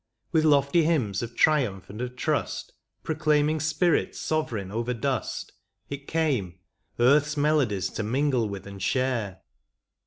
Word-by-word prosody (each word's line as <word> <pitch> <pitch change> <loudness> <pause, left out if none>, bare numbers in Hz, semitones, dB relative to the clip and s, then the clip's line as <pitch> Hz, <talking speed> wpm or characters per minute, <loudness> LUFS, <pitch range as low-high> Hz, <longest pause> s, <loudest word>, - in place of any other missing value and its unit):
With 160 -2 +3
lofty 145 +2 +4
hymns 130 - +1
of 120 0 -6
triumph 125 - +2
and 105 +4 -8
of 125 0 -4
trust, - - -2 0.3
Proclaiming 155 -1 +1
spirit 155 +3 +1
sovereign 115 -12 -2
over 120 +3 -2
dust. 130 +3 -2 0.4
It 140 0 -6
came, 130 - 0 0.4
earth's 145 +5 +4
melodies 145 -10 +2
to - - -4
mingle 125 0 +1
with 100 -2 -7
and 100 -1 -9
share. 115 -4 -1
130 Hz, 130 wpm, -26 LUFS, 110-150 Hz, 0.4 s, lofty